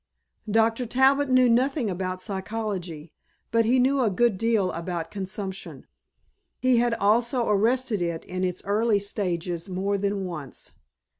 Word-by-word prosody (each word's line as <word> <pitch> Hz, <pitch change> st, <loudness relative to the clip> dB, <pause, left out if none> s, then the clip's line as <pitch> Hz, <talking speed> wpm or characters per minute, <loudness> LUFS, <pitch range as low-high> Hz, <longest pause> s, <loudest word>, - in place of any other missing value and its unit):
Dr. 225 Hz, +3 st, +2 dB
Talbot 265 Hz, +3 st, +3 dB
knew 255 Hz, -1 st, +5 dB
nothing 250 Hz, +2 st, +2 dB
about 185 Hz, -1 st, -3 dB
psychology 190 Hz, -6 st, -5 dB, 0.4 s
but 230 Hz, 0 st, +3 dB
he 245 Hz, +4 st, +3 dB
knew 265 Hz, +2 st, +3 dB
a 230 Hz, -, +3 dB
good 220 Hz, +3 st, +2 dB
deal 215 Hz, -2 st, +1 dB
about 165 Hz, -1 st, -4 dB
consumption. 190 Hz, 0 st, -5 dB, 0.7 s
He 255 Hz, -1 st, +3 dB
had 235 Hz, 0 st, +2 dB
also 235 Hz, +4 st, +2 dB
arrested 225 Hz, +1 st, +1 dB
it 170 Hz, -2 st, -2 dB
in 185 Hz, 0 st, -4 dB
its 180 Hz, -1 st, -2 dB
earlier 210 Hz, +1 st, +2 dB
stages 180 Hz, -3 st, -3 dB
more 195 Hz, +2 st, -1 dB
than 200 Hz, -1 st, -1 dB
once. 155 Hz, -7 st, -6 dB
205 Hz, 140 wpm, -25 LUFS, 185-235 Hz, 0.7 s, knew